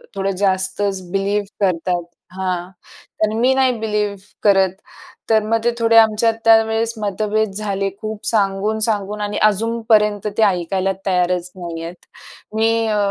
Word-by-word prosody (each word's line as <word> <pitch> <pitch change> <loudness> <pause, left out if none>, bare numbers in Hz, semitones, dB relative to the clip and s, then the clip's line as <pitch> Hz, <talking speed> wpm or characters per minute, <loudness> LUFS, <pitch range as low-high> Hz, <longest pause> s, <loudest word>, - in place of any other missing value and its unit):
थोडं 195 0 -1
जास्तच 190 0 0
बिलीव्ह 200 +1 0 0.2
करतात. 175 -1 -1 0.3
हां. 185 -1 -3 0.5
तर 215 0 +1
मी 255 +3 +4
नाही 265 -1 +3
बिलीव्ह 210 -2 -1 0.3
करत. 195 -2 +4 0.6
तर 220 -1 +4
मग 225 0 0
ते 240 - +2
थोडे 230 0 +4
आमच्यात 225 +1 +4
त्यावेळेस 225 0 +4
मतभेद 215 +1 -1
झाले. 200 -2 -2
खूप 215 -1 -6
सांगून, 205 0 +1
सांगून 210 -1 -2
आणि 205 0 -3
अजूनपर्यंत 215 -1 +1
ते 220 - +4
ऐकायला 190 0 +1
तयारच 180 -1 0
नाही 170 -2 -6
आहेत. 170 +1 -9 0.5
मी 225 +1 +2
अ, 210 -1 0
205 Hz, 135 wpm, -19 LUFS, 190-220 Hz, 0.6 s, मी